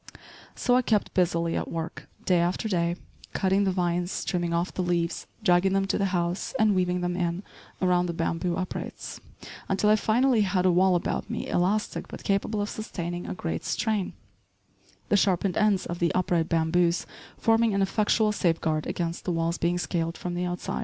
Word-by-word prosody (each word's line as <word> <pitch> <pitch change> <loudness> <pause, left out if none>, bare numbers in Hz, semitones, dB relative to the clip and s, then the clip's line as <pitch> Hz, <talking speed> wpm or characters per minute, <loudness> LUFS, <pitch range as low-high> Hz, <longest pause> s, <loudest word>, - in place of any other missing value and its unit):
So 245 - +2
I 255 - +5
kept 215 -4 0
busily 170 -2 +1
at - - -2
work, 165 0 -5 0.2
day 180 -2 +3
after 175 +5 0
day, 170 -4 0 0.4
cutting 195 +1 +2
the 190 - +2
vines, 175 0 -1
trimming 175 -2 -1
off 170 +2 -1
the - - -2
leaves, 175 -2 -1 0.2
dragging 185 -1 +4
them 195 0 +2
to 195 - -1
the 200 - +2
house 175 -1 -1
and 215 -1 +4
weaving 180 -1 +1
them 175 0 -1
in 175 +1 -1 0.4
around 180 -1 +3
the 170 - -2
bamboo 165 +1 -1
uprights, 185 -1 -5 0.5
until 205 +2 +3
I - - +7
finally 230 +3 +3
had 185 -2 +1
a 185 - +5
wall 185 +1 +4
about 175 - -2
me - - -3
elastic 200 +4 0
but - - -9
capable 205 +1 0
of 205 - -4
sustaining 175 -5 -5
a - - -4
great 165 -2 -3
strain, 210 -3 -1 1.0
the 205 - +4
sharpened 190 -2 +2
ends 210 -3 +2
of 170 0 -5
the 170 - +2
upright 175 -3 +1
bamboos 170 +1 +2 0.3
forming 225 -2 +3
an 195 - +3
effectual 215 +2 +2
safeguard 165 -5 0
against 170 -1 -3
the 180 - 0
walls 165 0 -1
being 175 +1 +1
scaled 165 -1 -2
from 180 - -4
the 175 +1 -1
outside. 175 0 -3
180 Hz, 185 wpm, -27 LUFS, 170-200 Hz, 1.0 s, I